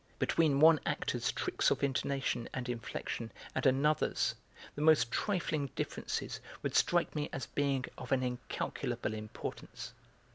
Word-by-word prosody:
Between 155 -4 +3
one 160 0 +8
actor's - - 0
tricks - - +1
of - - 0
intonation 135 -3 0
and 125 -2 -3
inflection 115 -1 -4 0.2
and 130 - +2
another's, 140 +3 +2 0.4
the 145 - -5
most 155 -6 +5
trifling 165 -8 0
differences - - -3 0.2
would - - -1
strike 175 -2 +3
me 150 -1 -1
as 135 - -3
being 140 -3 0
of 125 - -8
an 130 -1 +3
incalculable 125 -3 -2
importance. 110 0 -6
135 Hz, 135 wpm, -33 LUFS, 125-150 Hz, 0.4 s, one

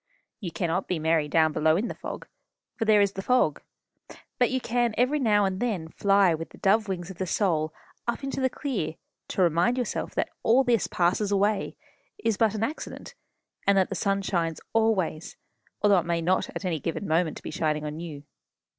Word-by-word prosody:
You 190 - -4
cannot 175 +2 -2
be 180 - -1
merry 160 -1 +1
down 155 0 +3
below 155 +1 +3
in 220 +6 -1
the - - -4
fog, - - -7 0.5
for 225 - -2
there 210 -1 +5
is 200 -1 +3
the 195 - -5
fog; 195 - +2 0.8
but 245 - +4
you 260 - 0
can 240 -2 0
every 255 +5 +2
now 210 -5 +3
and 190 -1 -2
then 200 -10 -2
fly 195 -1 +3
with 165 +1 -5
the - - -15
dove 210 +2 +2
wings 180 -1 -4
of 180 - -13
the 185 - -2
soul 160 -6 +1 0.4
up 235 +4 -2
into 270 0 -3
the 260 - +3
clear, 235 - -3 0.3
to 190 - +1
remind 175 +8 +2
yourself 245 -3 -3
that - - 0
all 245 +4 +4
this 240 -5 +2
passes 185 +4 +1
away, 205 +1 +1 0.4
is 225 - 0
but 220 0 +2
an 215 - -1
accident, 290 +7 -5 0.5
and 200 0 +5
that 190 - +3
the 195 - -3
sun 195 +1 0
shines 165 -4 -1
always, 205 -8 0 0.5
although 200 -3 +6
it 170 - -5
may 170 -1 +1
not 180 +3 +1
at - - -4
any 165 -4 -1
given 170 +6 -3
moment 160 0 0
be - - -5
shining 155 -1 -1
on 150 +1 -5
you. 155 -4 -7
195 Hz, 200 wpm, -27 LUFS, 165-220 Hz, 0.8 s, although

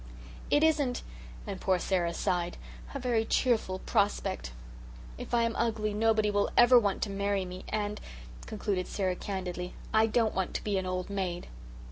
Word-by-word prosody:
It 290 - +4
isn't" 290 -6 +2 0.4
and 200 -3 -5
poor 190 -1 +3
Sara 175 -1 0
sighed 175 0 -1 0.4
"a - - 0
very 245 -4 +1
cheerful 225 -6 +1
prospect. 200 - 0 0.7
If - - -7
I 235 -1 +3
am 230 0 0
ugly 215 -2 0
nobody 215 0 +2
will 205 0 +2
ever 240 +1 +8
want 200 -4 0
to 205 - -2
marry 200 -1 0
me, 180 +1 -8
and," 210 -1 -2 0.5
concluded 200 -3 -2
Sara 185 -3 -1
candidly, 180 -2 -4 0.2
"I 220 0 +5
don't 225 0 +2
want 190 -1 -2
to - - -2
be 200 -2 0
an 185 - -4
old 185 +1 -3
maid." 185 -3 -3
205 Hz, 165 wpm, -30 LUFS, 185-225 Hz, 0.7 s, ever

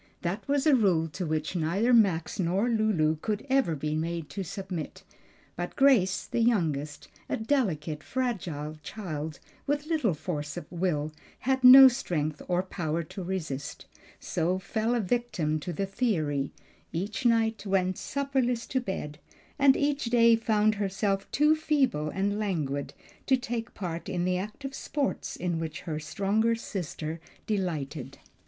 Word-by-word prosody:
That 195 +4 -3
was 285 0 +1
a 305 - +6
rule 185 -10 +3
to 170 +3 -4
which 155 +3 -2
neither 185 +9 +2
Max 185 -9 +3
nor 190 +5 +1
Lulu 210 -10 +2
could 210 - -3
ever 265 -12 +3
be 150 +1 -2
made 165 0 -2
to 195 - -3
submit; 185 -2 -6 0.5
but 175 +1 -4
Grace, 245 -10 +4
the - - -2
youngest, 160 -11 0 0.2
a - - 0
delicate, 185 - 0
fragile 170 - -3
child, 155 -5 -5 0.3
with 290 +1 0
little 300 - +1
force 150 -2 -4
of - - -5
will, 165 -4 -1 0.3
had 265 0 0
no 265 +1 +12
strength 155 - -1
or 180 0 +1
power 170 -3 -2
to 175 +5 -8
resist, 160 -7 -4 0.3
so 175 +2 0
fell 220 +5 -1
a - - +1
victim 185 -8 0
to 175 - -5
the 195 +4 -2
theory; 160 - -1 0.4
each 205 +10 -3
night 225 -2 +2
went 190 -2 +1
supperless 265 -3 -1
to 260 - +1
bed, 150 -10 -5 0.4
and 275 -1 +6
each 290 0 0
day 235 -1 +5
found 215 -1 +2
herself 195 0 -1
too 300 +2 +4
feeble 275 - +1
and 200 +4 -1
languid 150 -9 -2 0.3
to 265 - +5
take 235 -2 -4
part 170 -3 -5
in 175 -1 -1
the 180 0 +1
active 240 +8 -6
sports 280 0 -2
in 175 -2 -2
which 160 +1 -5
her 155 -2 -4
stronger 205 +8 +1
sister 165 -7 -5 0.3
delighted. 155 - -3
190 Hz, 150 wpm, -28 LUFS, 160-235 Hz, 0.5 s, no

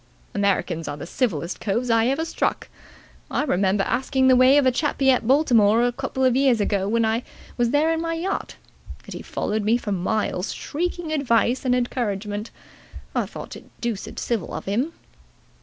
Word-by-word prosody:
"Americans 190 -5 0
are 145 0 -4
the 145 - -7
civillest 170 - -2
coves 235 +4 -1
I 230 0 +3
ever 275 +5 0
struck. 330 - -2 0.6
I - - 0
remember 195 -5 +1
asking 260 +3 +1
the 255 - +7
way 255 +3 +6
of 285 - +4
a 255 - +5
chappie 270 0 +2
at 245 -3 0
Baltimore 240 -5 +4
a 245 - +2
couple 265 +2 -2
of 255 -1 +3
years 265 -4 +3
ago 200 -2 0
when 230 +2 +2
I 220 +2 +1 0.3
was 240 -1 +1
there 305 +5 +2
in 325 - -2
my 330 0 -2
yacht, 365 +4 -3 0.5
and - - -8
he - - -7
followed 215 +1 -2
me 220 +3 +2
for 225 -4 -5
miles, 195 0 -1
shrieking 345 0 -3
advice 255 -3 +1
and 250 -1 +3
encouragement. 210 -4 -2 0.6
I - - 0
thought - - -8
it - - -13
deuced 235 -4 -4
civil 230 -7 -2
of - - -6
him." 240 +11 -1
240 Hz, 180 wpm, -23 LUFS, 205-265 Hz, 0.6 s, the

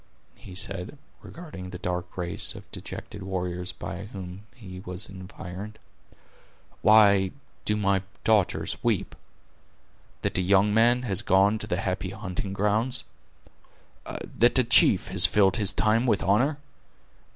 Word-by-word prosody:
he 90 - -11
said, 95 +6 -3 0.2
regarding 150 - -9
the 90 - -7
dark 90 0 -4
race 85 -1 0
of - - -10
dejected 100 - -7
warriors 90 -1 -3
by 90 +1 -7
whom 95 0 -9
he 95 -6 -10
was 90 0 -6
environed; 95 +2 -9 1.0
"why 100 -3 +6 0.4
do 105 - +1
my 100 -2 +1 0.2
daughters 110 -5 +1
weep? - - 0 1.1
that - - 0
a - - +2
young 100 +3 +3
man 120 +3 +4
has 100 -5 0
gone 100 +1 +3
to - - -6
the 90 - -1
happy 95 0 -2
hunting 95 -1 -5
grounds; 105 +5 0 1.2
that 120 +1 +3
a 130 - +5
chief 115 -5 +4
has 95 -1 +4
filled 100 +3 +3
his 105 -4 +6
time 110 +3 +1
with 105 -4 +2
honor? 130 +10 +2
100 Hz, 135 wpm, -26 LUFS, 95-110 Hz, 1.2 s, why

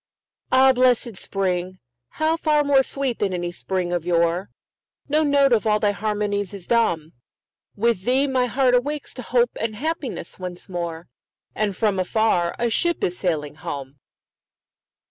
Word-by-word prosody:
Ah, 265 +1 +6
blessed 250 -2 +2
spring!—how 185 - -3
far 305 -2 +2
more 280 -2 +4
sweet 265 -2 -2
than 195 -3 0
any 175 0 -3
spring 180 0 -3
of 175 -2 -1
yore! 170 +2 +1 0.6
No 300 +2 +2
note 280 -3 +4
of 225 -1 +2
all 210 0 +3
thy 205 -1 +2
harmonies 205 -1 -2
is 190 -3 -10
dumb; 170 -9 +1 0.6
With 230 -1 +1
thee 260 +5 +2
my 260 -2 +1
heart 255 +1 +2
awakes 285 +4 -1
to 255 - -7
hope 245 0 +2
and 220 -1 -2
happiness 295 -3 -4
once 180 0 -7
more, 170 -2 -5 0.5
And 210 -3 -1
from 210 -4 +1
afar 185 -3 +1
a 240 - +1
ship 345 +8 0
is 180 0 -1
sailing 155 -6 -1
home! 140 -1 -6
210 Hz, 150 wpm, -23 LUFS, 180-255 Hz, 0.6 s, Ah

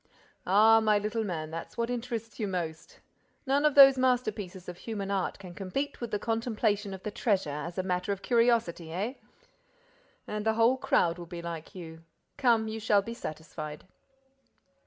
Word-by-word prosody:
"Ah, 215 +4 +6
my 215 -1 +3
little 215 +2 -1
man, 160 -6 -4
that's 165 +7 -7
what 235 +1 -1
interests 230 -2 -4
you 215 - -1
most! 170 -4 -5 0.4
None 280 +2 +2
of 300 - +3
those 270 -2 +9
masterpieces 215 -8 -1
of 180 -1 -8
human 200 -3 -4
art 195 -2 -1
can 185 -2 -10
compete 250 +12 -4
with 240 - -3
the 210 - -1
contemplation 220 -2 -1
of 190 - -13
the 210 - -3
treasure 195 -8 0
as 165 +5 -5
a 185 - 0
matter 180 +1 -1
of 195 -1 -4
curiosity, 230 -9 +2
eh?—And 275 - -9
the 220 0 +2
whole 230 +3 +4
crowd 170 -8 +2
will 175 - -8
be 170 -1 -7
like 165 0 -7
you!—Come, 185 - -2
you 220 +1 -4
shall 205 -2 +3
be 230 - -6
satisfied." 155 -5 -7
210 Hz, 165 wpm, -29 LUFS, 180-235 Hz, 0.4 s, those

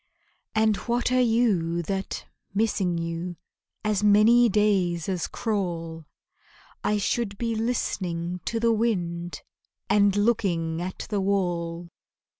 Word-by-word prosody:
And 220 -1 +3
what 240 +6 -1
are 255 0 +4
you 205 -8 +2
that, 190 +3 -4 0.3
missing 195 -5 +1
you, 170 +1 -4 0.5
As 210 -1 0
many 220 +4 +6
days 190 -5 +1
as 185 -3 -1
crawl 170 -7 -3 0.8
I 210 - +1
should 205 0 -1
be 230 +1 -1
listening 180 -7 -2
to 230 - -1
the 230 0 +3
wind 175 -6 -1 0.5
And 200 -1 +4
looking 180 -7 +1
at 185 +1 -5
the 205 -2 +1
wall? 175 -3 -1
195 Hz, 115 wpm, -26 LUFS, 170-220 Hz, 0.8 s, many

